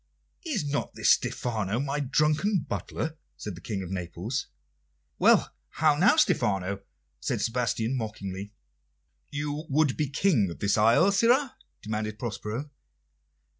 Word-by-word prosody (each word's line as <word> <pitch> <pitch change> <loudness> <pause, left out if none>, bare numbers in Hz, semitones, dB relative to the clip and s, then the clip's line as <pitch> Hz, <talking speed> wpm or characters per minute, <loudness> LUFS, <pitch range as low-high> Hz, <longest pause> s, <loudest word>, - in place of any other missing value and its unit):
"Is 275 - -2
not 145 0 -2
this - - +4
Stephano, 110 -3 0
my 140 +1 -1
drunken 150 +8 +2
butler?" 160 0 -4 0.2
said 105 - -6
the 85 - -11
King 100 -4 -4
of 90 - -7
Naples. 95 +7 -3 0.7
"Why, - - +5 0.3
how 155 -1 +4
now, 185 - +5
Stephano?" 100 - +1 0.4
said - - -2
Sebastian 115 0 0
mockingly. 100 -4 -5 0.8
"You 145 +2 -3
would 145 -1 +2
be 150 -3 0
King 135 - +2
of 85 - -7
the 100 -1 0
isle, 120 - +5
sirrah?" 245 +6 +3 0.3
demanded 110 0 -3
Prospero. 115 +5 -4
125 Hz, 130 wpm, -27 LUFS, 105-155 Hz, 0.8 s, Why